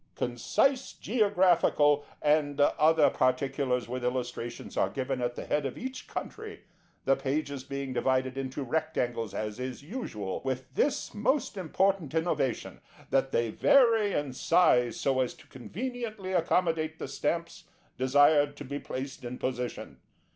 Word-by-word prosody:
Concise 255 - 0
Geographical 180 - +3 0.2
and 150 -1 +2
other 155 +2 +4
particulars 130 -1 0
with 125 +1 -4
Illustrations 125 -1 -4
are - - +2
given 130 -1 -3
at 120 0 -1
the - - -6
head 150 - 0
of 135 -2 -4
each 260 +1 -6
country, 430 -1 -7 0.4
the 135 - +4
pages 140 0 -2
being 140 -1 -4
divided 130 0 +1
into 135 +1 -4
rectangles, 125 -6 -2
as 105 +1 -4
is 130 +1 -5
usual, 130 - -5
with 130 -1 -4
this 285 - 0
most 235 +4 0
important 190 -3 0
innovation, 160 -6 -1 0.3
that 135 0 +2
they 115 -1 +1
vary 225 - +4
in 145 -6 -2
size 125 -5 +3
so 135 -2 +1
as 130 -2 0
to - - -18
conveniently 215 - -5
accommodate 165 -2 +1
the - - -5
Stamps 165 +5 -3 0.3
desired 145 +2 +4
to 145 - -7
be 140 +2 -4
placed 135 0 -6
in 125 +1 -5
position. 125 -1 -4
140 Hz, 140 wpm, -29 LUFS, 130-175 Hz, 0.4 s, other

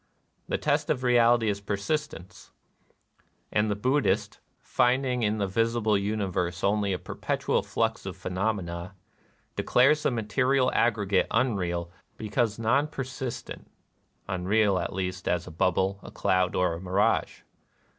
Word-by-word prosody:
The - - 0
test - - 0
of 125 - 0
reality 120 -2 +4
is 100 -1 -1
persistence; 100 - -4 1.0
and 105 0 +1
the 105 - 0
Buddhist, 130 +7 0 0.2
finding 125 0 +1
in 110 -1 +1
the 100 - 0
visible 115 +2 +1
universe 95 -4 -1
only 100 0 +1
a 90 - 0
perpetual - - -1
flux - - -2
of - - -6
phenomena, 90 -1 -3 0.6
declares 140 +5 +3
the 150 - +2
material 125 +3 +1
aggregate 105 -5 +2
unreal 90 -8 0 0.3
because 110 0 -1
non 125 +6 +2
persist 130 -3 -5
ent, - - -10 0.3
— - - -42
unreal, 95 +1 +2
at - - -3
least, 90 -1 -4
as 90 -1 0
a 90 - -9
bubble, 95 +4 +1
a - - -10
cloud, 90 0 +1
or 90 -2 +2
a 85 - -6
mirage. 95 +2 0
105 Hz, 135 wpm, -27 LUFS, 95-120 Hz, 1.0 s, reality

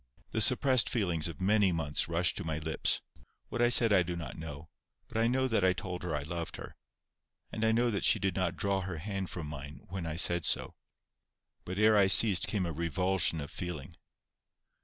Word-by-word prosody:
The - - 0
suppressed 130 -3 +5
feelings 90 -9 0
of 85 -4 -8
many 100 0 +3
months 80 -2 0
rushed 85 +1 +1
to - - -4
my 80 -2 -3
lips. 80 +1 -1 0.5
What 120 - -3
I 120 - +4
said 115 -3 +3
I 95 - +5
do 90 0 -3
not 75 -8 -7
know, 80 -1 -8 0.4
but - - -17
I 115 +1 +2
know 130 +2 +1
that 110 -5 0
I 95 0 +4
told 90 -1 -6
her 90 -4 -3
I 75 - -3
loved 85 +2 -5
her. - - -10 0.8
And 110 - -4
I 110 - +3
know 120 +1 +2
that 100 - -2
she - - +4
did 95 -3 -2
not 95 -2 -1
draw 100 -1 0
her 90 -2 -5
hand 95 +2 -4
from 85 -4 -6
mine 75 0 -9
when 90 -2 -5
I 80 - -4
said 85 -1 +3
so. - - -1 0.9
But 90 +2 -5
ere 110 0 +4
I 100 - +5
ceased 95 -2 +6
came 100 -4 -1
a 85 - -3
revulsion 85 +1 0
of 70 - -8
feeling. 85 -3 -6
90 Hz, 210 wpm, -31 LUFS, 80-100 Hz, 0.9 s, ceased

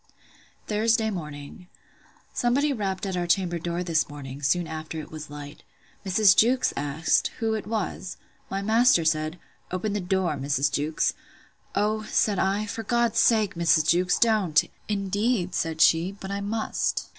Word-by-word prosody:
Thursday 220 +1 +1
morning. 150 0 -8 0.7
Somebody 275 +4 +1
rapped 195 -5 -3
at 190 -1 -3
our 175 -1 -1
chamber 175 -1 +1
door 170 +2 -3
this 165 -3 0
morning, 140 -1 -8
soon 175 +5 +1
after 160 0 -6
it 155 - -9
was 155 -1 -8
light: 145 0 -9 0.4
Mrs. 195 0 +4
Jewkes 250 +5 +3
asked, 145 +3 +1
who 225 -1 0
it 215 -2 -4
was? 210 -4 -3 0.3
My 195 +1 -3
master 220 -4 +4
said, 155 +1 0 0.3
Open 185 +3 -2
the 210 - -1
door, 180 -4 0
Mrs. 140 0 0
Jewkes! 150 +2 0 0.6
O, 215 +2 +1
said 210 -2 +1
I, 200 +2 +1
for 215 +2 -5
God's 235 +1 +1
sake, 215 -4 +3
Mrs. 165 -2 +2
Jewkes, 180 +1 +3
don't! 210 -9 +3 0.3
Indeed, 205 -1 0
said 160 -1 -2
she, 165 +3 +4
but 195 -1 -8
I 200 0 -3
must. 215 +2 -2
185 Hz, 155 wpm, -25 LUFS, 160-215 Hz, 0.7 s, Mrs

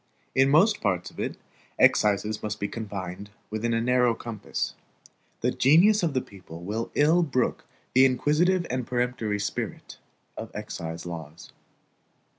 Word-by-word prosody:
In 135 +1 +4
most 195 +9 +4
parts 90 -4 -1
of - - -14
it, - - -3 0.4
excises 105 +1 +3
must 105 0 -4
be 100 - -1
confined 100 -3 -6 0.2
within 110 +2 -1
a 115 - +2
narrow 125 0 +3
compass. 115 -2 -4 0.7
The - - +2
genius 185 +10 +5
of 160 -5 -1
the 130 - +2
people 85 -6 -12
will 110 +5 -3
ill 160 +4 +4
brook 130 -7 -1 0.3
the 130 +1 +7
inquisitive 155 +8 +2
and 125 -2 -2
peremptory 120 -4 -1
spirit 100 - -5 0.4
of - - -6
excise 80 +1 -6
laws. 80 -2 -8
115 Hz, 140 wpm, -26 LUFS, 100-135 Hz, 0.7 s, the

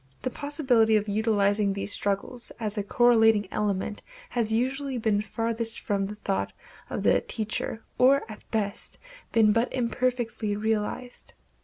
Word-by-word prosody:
The 255 - -1
possibility 255 -7 +2
of 210 0 +1
utilizing 205 -1 +2
these 200 +1 0
struggles 205 +5 0
as 215 -2 -1
a 210 - -1
correlating 225 -1 +4
element 205 0 -2 0.3
has 230 -3 0
usually 260 +3 -1
been 220 -3 +1
farthest 225 +1 0
from 200 -2 -1
the 210 - -7
thought 200 -2 -2 0.4
of - - -3
the - - +4
teacher, 220 0 -3 0.2
or 275 +2 +5
at 215 -2 -10
best 210 -3 -3 0.3
been 220 -2 +5
but 230 +3 +1
imperfectly 240 -3 -1
realized. 220 +3 -3
220 Hz, 140 wpm, -27 LUFS, 205-240 Hz, 0.4 s, or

